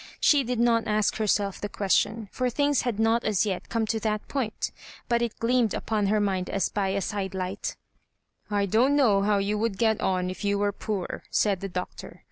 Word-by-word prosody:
She 290 Hz, -2 st, +4 dB
did 245 Hz, -1 st, -2 dB
not 235 Hz, -1 st, +3 dB
ask 210 Hz, -1 st, +1 dB
herself 205 Hz, -2 st, 0 dB
the 205 Hz, -, -3 dB
question, 210 Hz, +2 st, 0 dB
for 255 Hz, -1 st, 0 dB
things 285 Hz, +2 st, +1 dB
had 235 Hz, -4 st, -2 dB
not 225 Hz, +1 st, +3 dB
as 215 Hz, -1 st, +1 dB
yet 190 Hz, -3 st, -3 dB
come 225 Hz, -1 st, 0 dB
to 220 Hz, +1 st, -1 dB
that 215 Hz, -1 st, -2 dB
point, 250 Hz, -6 st, -2 dB, 0.4 s
but 235 Hz, -1 st, +2 dB
it 235 Hz, -2 st, -2 dB
gleamed 235 Hz, -2 st, +2 dB
upon 210 Hz, -2 st, -1 dB
her 215 Hz, +2 st, +2 dB
mind 190 Hz, -3 st, -1 dB
as 195 Hz, -2 st, 0 dB
by 200 Hz, -2 st, -1 dB
a 195 Hz, +1 st, -1 dB
side 195 Hz, -2 st, -3 dB
light 185 Hz, +1 st, -3 dB, 0.4 s
" -, -, -45 dB
I 200 Hz, -, +2 dB
don't 235 Hz, +8 st, +3 dB
know 220 Hz, -9 st, +4 dB
how 205 Hz, 0 st, +2 dB
you 205 Hz, +1 st, 0 dB
would 220 Hz, -3 st, -1 dB
get 220 Hz, 0 st, +2 dB
on 185 Hz, -1 st, 0 dB
if 185 Hz, -, -8 dB
you 200 Hz, 0 st, +1 dB
were 205 Hz, 0 st, +1 dB
poor," 200 Hz, -2 st, -4 dB
said 200 Hz, -3 st, +1 dB
the 195 Hz, -, -5 dB
Doctor. 180 Hz, 0 st, -6 dB
210 Hz, 215 wpm, -26 LUFS, 195-230 Hz, 0.4 s, She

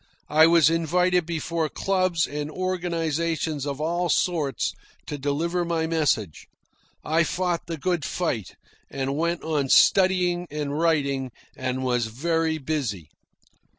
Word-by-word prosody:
I 160 Hz, +1 st, +7 dB
was 165 Hz, -3 st, +5 dB
invited 180 Hz, +1 st, +1 dB
before 165 Hz, -1 st, -2 dB
clubs 185 Hz, -1 st, +1 dB
and 150 Hz, +1 st, -4 dB
organisations 165 Hz, -4 st, -2 dB
of 140 Hz, 0 st, -4 dB
all 170 Hz, +3 st, -1 dB
sorts 155 Hz, -5 st, 0 dB, 0.3 s
to 150 Hz, -, -5 dB
deliver 165 Hz, +6 st, -1 dB
my 165 Hz, -1 st, -1 dB
message. 150 Hz, -, -1 dB, 0.6 s
I 160 Hz, +2 st, +3 dB
fought 175 Hz, 0 st, -2 dB
the 165 Hz, -1 st, -4 dB
good 175 Hz, 0 st, -1 dB
fight, 130 Hz, -, -3 dB, 0.3 s
and 135 Hz, 0 st, -3 dB
went 170 Hz, +2 st, -1 dB
on 150 Hz, -4 st, -1 dB
studying 180 Hz, -1 st, +4 dB
and 145 Hz, -1 st, -3 dB
writing, 140 Hz, -5 st, +1 dB, 0.3 s
and 130 Hz, +1 st, -3 dB
was 125 Hz, -3 st, 0 dB
very 160 Hz, +6 st, 0 dB
busy. 130 Hz, -, -3 dB
160 Hz, 125 wpm, -25 LUFS, 145-170 Hz, 0.6 s, I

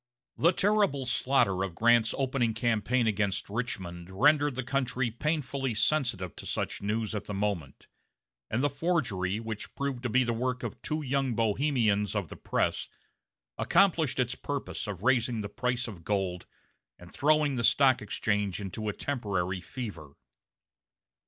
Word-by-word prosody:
The 170 Hz, -, +4 dB
terrible 195 Hz, -8 st, +2 dB
slaughter 125 Hz, -7 st, +2 dB
of 95 Hz, -3 st, -4 dB
Grant's 115 Hz, +1 st, +4 dB
opening 130 Hz, -4 st, 0 dB
campaign 120 Hz, +2 st, +1 dB
against 100 Hz, -2 st, 0 dB
Richmond 95 Hz, -7 st, -4 dB
rendered 145 Hz, +7 st, +3 dB
the 130 Hz, -, -2 dB
country 130 Hz, -2 st, 0 dB
painfully 135 Hz, -1 st, -1 dB
sensitive 115 Hz, -, 0 dB
to -, -, -8 dB
such -, -, -2 dB
news 110 Hz, +2 st, -1 dB
at 105 Hz, -, -3 dB
the 105 Hz, -, -5 dB
moment; 95 Hz, -9 st, -3 dB, 0.6 s
and 120 Hz, +5 st, 0 dB
the 145 Hz, -, +3 dB
forgery, 120 Hz, -, 0 dB
which 110 Hz, -2 st, -6 dB
proved 140 Hz, -3 st, -2 dB
to 125 Hz, -, -2 dB
be 130 Hz, +3 st, +4 dB
the 120 Hz, -1 st, 0 dB
work 125 Hz, +2 st, -2 dB
of 115 Hz, -, -5 dB
two 155 Hz, 0 st, -2 dB
young 135 Hz, -2 st, 0 dB
Bohemians 110 Hz, -3 st, +1 dB
of 100 Hz, -7 st, -2 dB
the -, -, -8 dB
press, -, -, -1 dB, 0.7 s
accomplished 165 Hz, -9 st, +3 dB
its 125 Hz, -1 st, +1 dB
purpose 140 Hz, -4 st, -4 dB
of 100 Hz, -2 st, -5 dB
raising 120 Hz, -2 st, +2 dB
the 100 Hz, -, -5 dB
price 125 Hz, +2 st, -1 dB
of 95 Hz, -7 st, -9 dB
gold, 95 Hz, -2 st, -1 dB, 0.5 s
and 90 Hz, 0 st, -14 dB
throwing 150 Hz, -1 st, +3 dB
the 120 Hz, -, -1 dB
Stock 130 Hz, +1 st, +5 dB
Exchange 105 Hz, -2 st, -1 dB
into 105 Hz, +2 st, -4 dB
a -, -, -2 dB
temporary 95 Hz, -10 st, -2 dB
fever. 90 Hz, -, -7 dB
120 Hz, 150 wpm, -29 LUFS, 100-135 Hz, 0.7 s, Stock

